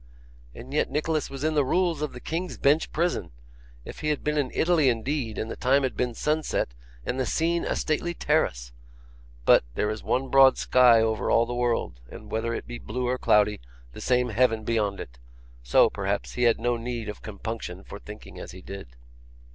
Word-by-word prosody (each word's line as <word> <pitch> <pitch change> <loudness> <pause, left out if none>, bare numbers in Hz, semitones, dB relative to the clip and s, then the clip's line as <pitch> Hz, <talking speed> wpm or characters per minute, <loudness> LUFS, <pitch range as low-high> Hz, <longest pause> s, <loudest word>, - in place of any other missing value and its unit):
And 130 +3 -10
yet 150 - +1
Nicholas 155 0 -1
was 135 0 -7
in 155 0 +1
the 150 -2 +3
Rules 170 +2 +1
of 150 - -2
the 125 - -9
King's 170 +6 -4
Bench 145 +3 +2
Prison! 175 +2 -1 0.6
If - - -9
he 155 - -1
had 150 - -1
been 150 0 0
in 145 -4 0
Italy 160 -5 +3
indeed, 120 0 -2
and 110 - -3
the - - -4
time 135 +2 +2
had 130 - -1
been 125 -2 -1
sunset, 150 - -1 0.3
and 130 - -2
the 130 - +1
scene 170 +1 +1
a - - -1
stately 170 +3 -1
terrace! - - 0 0.7
But, - - +6
there 105 - 0
is 110 - -5
one 130 +1 -1
broad 135 -1 +6
sky 125 -3 +5
over 110 -1 0
all 115 - +4
the 120 - -5
world, 120 - -1
and - - -11
whether 110 +1 -1
it 115 - -4
be 120 0 -7
blue 125 +3 -3
or 125 +1 -1
cloudy, 105 -3 +3 0.3
the - - -9
same 125 -1 +2
heaven 115 -1 +2
beyond 105 -3 0
it; - - -9 0.4
so, - - +5
perhaps, - - -2
he 125 - +1
had 115 -2 +4
no 120 +1 0
need 115 -1 -4
of 105 - -7
compunction 110 +2 -6
for - - -10
thinking - - -11
as - - -8
he 95 - -11
did. 95 -12 -9
125 Hz, 205 wpm, -26 LUFS, 110-150 Hz, 0.7 s, But